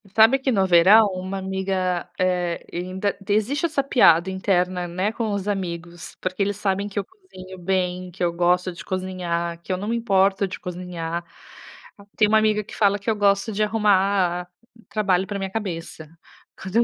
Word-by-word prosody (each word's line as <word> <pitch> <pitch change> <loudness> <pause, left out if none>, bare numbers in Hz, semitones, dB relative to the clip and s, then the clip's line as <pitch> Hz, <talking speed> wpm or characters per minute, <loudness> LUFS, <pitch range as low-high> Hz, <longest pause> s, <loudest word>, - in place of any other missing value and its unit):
sabe 225 +5 +6
que 265 0 0
no 195 -4 +2
verão 190 +5 +6
uma 185 +1 -4
amiga, 190 -2 -2
eh, 180 -2 0
ainda 185 +3 -2
t 200 0 -4
existe 265 +10 +1
essa 290 -4 0
piada 190 -10 +4
interna, 180 -1 0
né, 185 +5 -1
com 225 -2 -3
os 200 0 -3
amigos, 175 -3 -5
porque 185 +2 -3
eles 205 0 -1
sabem 200 0 -1
que 205 - -10
eu - - -2
cozinho 185 - -13
bem, 180 0 -1
que 180 +1 -5
eu 170 - +2
gosto 180 +1 +1
de 170 - -11
cozinhar, 175 -2 -3
que 185 - -7
eu - - -1
não 205 +3 -4
me 235 - 0
importo 195 -3 +2
de - - -7
cozinhar. 175 -1 -5 0.9
Tem 210 - +5
uma 220 +1 +4
amiga 215 -1 +1
que - - -12
fala 205 -1 +2
que 200 - -4
eu 220 - +2
gosto 200 +2 +2
de 210 +1 0
arrumar 195 -4 +1 0.4
trabalho 195 -3 +1
pra 200 -1 -4
minha 190 -1 -4
cabeça, 170 -7 -5 0.5
quando 190 +2 -7
eu 235 - +6
190 Hz, 185 wpm, -23 LUFS, 180-205 Hz, 0.9 s, sabe